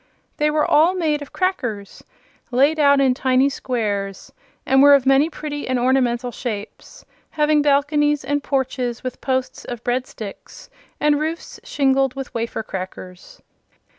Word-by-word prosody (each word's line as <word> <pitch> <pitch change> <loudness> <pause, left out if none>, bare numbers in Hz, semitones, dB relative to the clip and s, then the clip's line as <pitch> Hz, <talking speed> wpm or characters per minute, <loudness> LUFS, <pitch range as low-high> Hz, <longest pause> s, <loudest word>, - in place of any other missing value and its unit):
They 300 0 +2
were 300 0 +1
all 330 +5 +4
made 310 -5 0
of 290 - -9
crackers 245 - -3 0.5
laid 280 +5 +2
out 280 -1 +5
in 265 -2 +3
tiny 260 +1 +2
squares, 205 -8 -4 0.3
and 270 0 +4
were 285 0 +8
of 270 -2 +1
many 270 +4 +4
pretty 295 -2 -6
and 255 0 0
ornamental 245 -1 +1
shapes, 220 -5 -7 0.2
having 300 -1 +2
balconies 295 0 +2
and 290 0 -1
porches 260 -4 -2
with 255 -1 -6
posts 260 -1 -2
of 240 -1 -7
bread 250 +1 -1
sticks 205 -3 -10 0.3
and 295 -1 +2
roofs 320 +2 -5
shingled 270 -2 +1
with 270 -1 -7
wafer 230 -1 -3
crackers. 185 -2 -9
270 Hz, 145 wpm, -21 LUFS, 245-295 Hz, 0.5 s, were